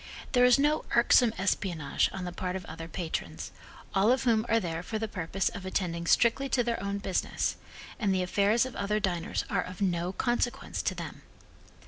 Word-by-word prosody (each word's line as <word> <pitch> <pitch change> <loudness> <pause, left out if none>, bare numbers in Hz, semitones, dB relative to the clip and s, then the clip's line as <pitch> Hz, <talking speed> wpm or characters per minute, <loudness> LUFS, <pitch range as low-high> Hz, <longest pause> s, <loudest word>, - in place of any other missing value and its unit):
There 245 -1 +5
is 250 +1 +6
no 295 +2 +2
irksome 245 -3 +5
espionage 175 -6 0
on 190 -1 -5
the 180 - -4
part 180 +1 -3
of 185 -2 -5
other 165 +1 -7
patrons, 170 -1 -4 0.4
all 200 +3 +4
of 260 - +2
whom 230 -2 +2
are 230 - +4
there 165 -5 -3
for 220 +5 -4
the 220 +1 -2
purpose 190 -1 -2
of 200 - -8
attending 175 -3 -2
strictly 240 +7 +3
to 245 - +2
their 235 -3 -1
own 200 +1 -2
business, 195 -2 -1 0.4
and 210 -5 +1
the 185 -1 +1
affairs 205 +6 +2
of 260 - -7
other 205 +1 0
diners 175 -4 -1
are - - 0
of 185 0 -8
no 180 -2 0
consequence 240 +4 -1
to - - -1
them. - - -7
200 Hz, 190 wpm, -29 LUFS, 180-230 Hz, 0.4 s, is